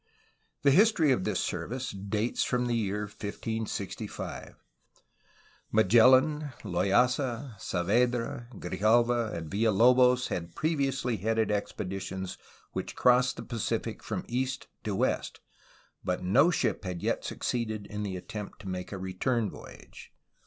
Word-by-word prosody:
The 140 - +6
history 175 -3 +5
of 120 -8 +1
this - - 0
service 130 +2 -3
dates 105 +4 -1
from 125 -1 0
the 120 - 0
year 105 -2 -1
1565. 105 0 -5 1.2
Ma 110 - +5
gellan, 130 +7 +5
Loaysa, 120 +6 +1
Saavedra, 120 +7 0
Grijalva, 110 +5 +2
and 85 -2 -5
Villalobos 125 +4 +4
had 85 -1 -4
pre 160 +2 0
viously 135 -5 -1
headed 110 +2 +1
expeditions 95 -2 -4 0.3
which - - -5
crossed 125 0 +4
the - - -7
Pacific 115 -4 -3
from - - -4
east 130 +2 -2 0.2
to 105 -2 -2
west, - - -1 0.6
but 90 0 -2
no 130 - +5
ship 175 - 0
had 90 -3 -5
yet - - 0
succeeded 110 -4 -2
in 105 +1 -5
the 95 -3 -3
attempt 105 +2 -7
to 100 - -9
make 90 -1 -4
a 100 - -4
return 100 +5 -1
voyage. - - -12
115 Hz, 130 wpm, -29 LUFS, 100-125 Hz, 1.2 s, The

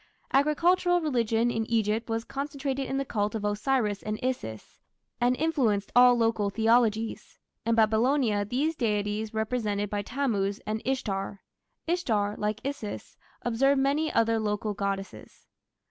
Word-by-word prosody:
Agricultural 350 +5 +3
religion 235 -6 +1
in 225 - -1
Egypt 225 0 0
was 225 0 -1
concentrated 275 0 -3
in 270 - -1
the 275 - -1
cult 210 -3 -1
of 210 -2 -3
Osiris 210 -1 0
and 215 0 -4
Isis, 110 - -4 0.4
and 245 +1 +3
influenced 250 -11 +1
all 245 0 +7
local 225 -3 +1
theologies. 225 +1 +1 0.3
In 230 - +3
Babylonia 225 0 +2
these 275 +10 -1
deities 210 -2 -1
were 220 - -6
represented 210 -3 -2
by 205 -1 -1
Tammuz 205 -5 -1
and 215 +1 -2
Ishtar. 200 -7 -2 0.4
Ishtar, 225 - 0
like 210 +1 -2
Isis, 275 -7 -5 0.3
absorbed 270 +4 +2
many 295 +3 +1
other 230 0 +2
local 210 0 -1
goddesses. 195 -1 -5
225 Hz, 135 wpm, -28 LUFS, 210-270 Hz, 0.4 s, all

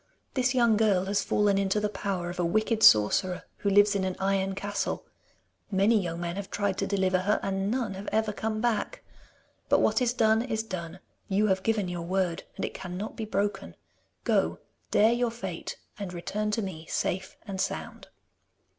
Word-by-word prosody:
This 255 0 +1
young 235 -3 +4
girl 200 -4 +3
has 200 +1 +1
fallen 205 -1 +2
into 195 +1 +1
the 210 - 0
power 195 -4 -3
of 180 - -9
a - - +2
wicked 215 +5 +1
sorcerer, 180 - +5
who 200 - 0
lives 205 +1 +5
in 195 -1 0
an 185 -1 -1
iron 195 0 0
castle. 205 +1 -3 0.6
Many 205 +2 +3
young 170 -2 -4
men 175 +1 -3
have 200 -1 -5
tried 200 -2 -1
to 195 - 0
deliver 190 -2 +2
her, 205 +3 +1
and 195 0 -1
none 235 -4 -1
have 195 +1 -6
ever 220 -1 +1
come 215 +1 -2
back. 235 -3 -1 0.7
But - - +5
what - - +2
is 245 -1 +3
done 220 -2 +3
is 225 -3 -2
done! 180 -3 -6 0.3
You 200 +2 +2
have 190 0 +2
given 215 -2 0
your 175 -1 -4
word, 180 0 -1
and - - -2
it - - -5
cannot 190 +3 -6
be 220 - -4
broken. 205 -1 -2 0.5
Go, - - +1 0.3
dare 220 +2 +5
your 240 0 +1
fate, 195 -7 -6 0.2
and 200 -3 -4
return 205 +4 -3
to 220 +1 -1
me 165 -4 -6
safe 190 +1 -2
and 195 -3 -3
sound. - - -4
200 Hz, 190 wpm, -28 LUFS, 185-215 Hz, 0.7 s, sorcerer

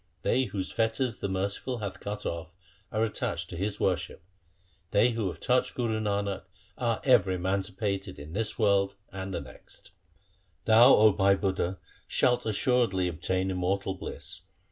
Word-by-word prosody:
They 130 +1 +2
whose 95 -5 -4
fetters 115 0 0
the 100 - -2
Merciful 100 +6 -2
hath 100 -3 -5
cut 105 0 -5
off, 85 0 -4 0.4
are 110 +1 +1
attached 110 - -2
to - - -5
His 100 +4 -2
worship. 90 -3 -1 0.7
They 120 +4 +4
who 110 -3 -1
have 90 - -5
touched 125 0 +1
Guru 115 -3 0
Nanak 100 -2 -1 0.3
are 115 -2 -1
ever 100 -8 +4
emanci 95 +1 -1
pated 100 -2 -2
in 75 +2 -9
this 110 +3 -1
world 100 -2 +2 0.2
and 95 0 -5
the - - -3
next. - - -14
1 - - -34 0.4
' 90 -5 -40
Thou, 115 +2 +8
O 110 0 +6
Bhai 100 0 +4
Budha, 95 -1 -1 0.3
shalt 125 -2 +2
assuredly 110 -5 +2
obtain 95 +3 -1
immortal 95 +1 -1
bliss. 95 - -7
100 Hz, 165 wpm, -28 LUFS, 95-110 Hz, 0.7 s, Thou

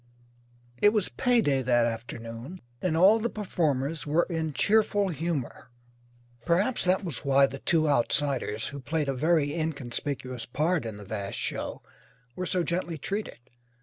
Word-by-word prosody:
It 205 - +6
was 210 -4 +1
pay 245 -2 +2
day 135 -8 +1
that 120 -2 +3
afternoon 115 +7 -6 0.2
and 170 -3 0
all 200 +6 +6
the 235 +2 -1
performers 155 - -1
were 160 +4 +3
in 160 -2 -1
cheerful 205 +3 +2
humour. 160 -7 -3 0.7
Perhaps 185 - +1
that 185 +2 +2
was 165 -8 -4
why 140 0 +5
the 135 0 -6
two 155 0 +2
outsiders, 125 -4 +1
who 140 - -7
played 150 +3 -2
a - - +1
very 150 +1 +2
inconspicuous 135 -5 -3
part 150 +1 0
in 110 -2 -6
the 105 - -10
vast 100 -1 -4
show, - - -3 0.5
were 180 - -3
so 180 -1 +1
gently 170 -1 -2
treated. 200 - -4
155 Hz, 150 wpm, -28 LUFS, 130-180 Hz, 0.7 s, It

